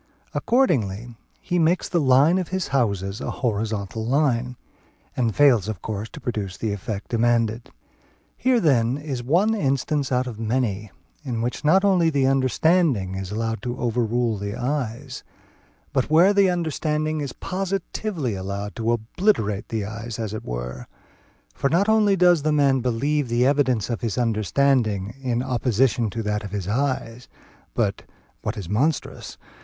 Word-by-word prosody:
Accordingly 120 - +1 0.2
he 175 - -1
makes 170 +2 +2
the 170 - +1
line 140 +7 +4
of 180 - -3
his 190 -1 -3
houses 100 -7 -1
a - - -3
horizontal 110 -2 -2
line, 125 -1 +1 0.6
and 115 -4 0
fails 125 -9 +4
of 110 -4 -5
course 110 0 -4
to - - -10
produce 105 -8 -4
the 110 -2 -2
effect 100 +1 -5
demanded. 115 -1 +1 0.7
Here 255 -1 +2
then 130 - +2
is 145 -4 -4
one 175 - +2
instance 140 - 0
out 125 0 +1
of 115 -4 -7
many, 110 -3 -1 0.3
in 125 -5 -3
which 120 - -3
not 190 +6 +4
only 180 -4 +4
the 140 -4 +1
understanding 135 - +2
is 95 -1 -5
allowed 115 +1 -2
to 120 0 -4
overrule 120 -2 0
the 100 +1 -4
eyes, 130 0 -3 0.7
but 130 - 0
where 170 +6 +5
the 200 -2 +4
understanding 155 -2 -1
is 140 -4 -4
positively 190 - -3
allowed 100 +2 -5
to 115 0 0
obliterate 110 - 0
the 110 -3 -2
eyes 110 +2 -6
as 110 -3 -4
it 110 - -5
were, - - -6 0.7
for 140 - 0
not 180 +7 +2
only 215 -2 +4
does 175 -3 +4
the 155 +1 +1
man 140 -3 +3
believe 130 +3 0
the 120 +1 +2
evidence 130 -6 +2
of 120 - -3
his 115 -5 -2
understanding 115 -2 +1
in 125 -2 -1
opposition 125 -2 +1
to 115 +2 -4
that 105 0 -2
of 100 - -6
his 100 -2 -4
eyes, 125 0 -2 0.5
but, - - 0 0.4
(what 110 +2 -3
is 100 -5 -6
monstrous!) 135 - -1
125 Hz, 155 wpm, -23 LUFS, 110-150 Hz, 0.7 s, where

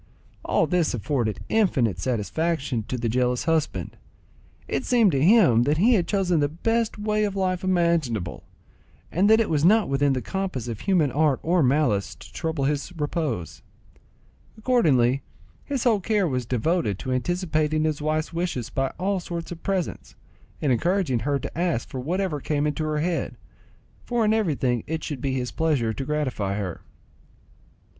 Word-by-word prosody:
All - - +2
this 175 -7 +1
afforded 110 -5 -1
infinite 135 - +1
satisfaction 130 +2 -1
to 130 - -3
the 120 -1 -2
jealous 125 +1 +1
husband; 165 -1 -1 0.7
it - - -2
seemed 235 -6 +4
to 135 -2 +1
him 175 - +6
that 150 +3 +2
he 225 +9 +4
had 185 -7 +2
chosen 185 -5 +1
the 145 -1 +1
best 225 +9 -1
way 210 0 0
of 200 -2 -1
life 185 -1 -1
imaginable, 170 - 0 0.7
and 190 +5 +3
that 220 +1 +6
it 225 - +2
was 150 -2 0
not 210 +3 +5
within 140 0 +2
the 130 - -1
compass 185 - -3
of 115 -3 -5
human 170 -8 +2
art 145 0 +2
or 175 +1 +2
malice 125 -7 +1
to - - -14
trouble 160 -3 -2
his 145 +4 -1
repose: 145 - -3 1.0
accordingly 140 - +3 0.4
his 275 -4 -2
whole 225 -4 +3
care 205 -1 +1
was 125 -5 -2
devoted 125 - 0
to 130 - -5
anticipating 155 +1 0
his 155 -2 -1
wife's 155 +2 -1
wishes 165 -9 -3
by 135 0 0
all 190 +1 0
sorts 170 -1 -6
of 170 - -7
presents, 190 -3 -3 0.5
and 145 - +2
encouraging 165 - +1
her 140 +5 0
to 135 - -7
ask 170 -7 -1
for 130 - -5
whatever 170 +3 -1
came 145 +1 0
into 150 +1 -1
her 155 -1 -1
head, 170 +1 -2 0.7
for 240 -2 0
in 215 - +3
everything 140 - 0
it 160 0 -3
should 140 -5 -5
be 135 -1 -1
his 125 -1 -2
pleasure 145 -9 0
to 135 - -5
gratify 130 -10 -1
her. 95 -5 -4
155 Hz, 165 wpm, -24 LUFS, 130-185 Hz, 1.0 s, him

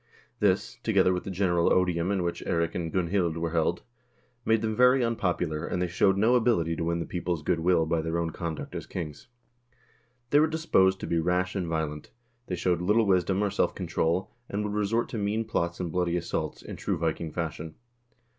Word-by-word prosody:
This, - - +1
together 90 - +3
with 90 - -3
the - - -4
general 90 -2 +2
odium 90 -1 +2
in 95 -3 0
which 85 - -3
Eirik 85 -1 0
and 85 -2 -3
Gunhild 90 -2 0
were 85 -1 -2
held, 85 +1 0 0.6
made 115 -1 +2
them 110 -1 -1
very 125 +1 +5
unpopular, 90 -9 -1
and 90 - -2
they 90 - +1
showed 95 +3 +2
no 110 +5 +4
ability 110 -10 +2
to 80 - -3
win 85 0 0
the 85 - -3
people's 85 -3 -3
good 85 - +1
will 80 -1 +3
by 80 0 0
their 80 +1 -2
own 85 -1 -1
conduct 80 -1 -5
as - - -6
ki, - - -5
ngs. 75 -3 -8 1.0
They 145 - +6
were 155 - +5
disposed 150 - +2
to - - -3
be 85 - 0
rash 90 +2 0
and 90 -3 -2
violent; 80 -2 -3 0.4
they 90 - -2
showed 90 0 0
little 105 +5 +3
wisdom, 95 +1 +2
or 100 - 0
self - - 0
control, 85 +4 -1 0.2
and 105 +1 -2
would 105 -1 -3
resort 105 +3 0
to 115 - -4
mean 105 +2 -1
plots 85 -5 -2
and 90 -3 -3
bloody 90 0 0
assaults, 85 - -3
in - - -8
true - - -2
Viking 80 0 -2
fashion. 80 -1 -4
90 Hz, 205 wpm, -27 LUFS, 85-100 Hz, 1.0 s, They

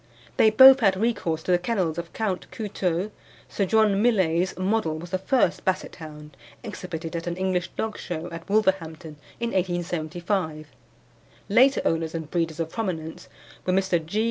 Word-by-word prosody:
They 220 - +6
both 265 +5 +9
had 195 -6 +3
recourse 195 -8 -1
to - - -1
the 175 - +4
kennels 180 -4 -1
of 170 0 -7
Count 205 -5 -3
Couteulx. 195 -2 -2 0.4
Sir 200 - -1
John 210 -1 +3
Millais' 185 -7 +2
Model 185 -4 0
was 170 +2 -9
the 185 - 0
first 260 +6 +1
Basset 190 -2 -2
hound 150 -2 -11 0.3
exhibited 180 -6 -6
at 165 +1 -4
an 175 0 -3
English 185 -2 0
dog 220 -1 -3
show, 170 -1 -5
at 165 +2 -9
Wolverhampton 170 -7 0 0.2
in 235 0 -1
1875. 175 -2 -2 0.8
Later 260 +6 +5
owners 165 0 0
and 160 -2 -5
breeders 165 -2 -1
of 165 -1 -2
prominence 165 -8 -4 0.4
were 185 - +2
Mr. 185 -3 +1
G. 175 +7 -3
180 Hz, 160 wpm, -25 LUFS, 165-205 Hz, 0.8 s, both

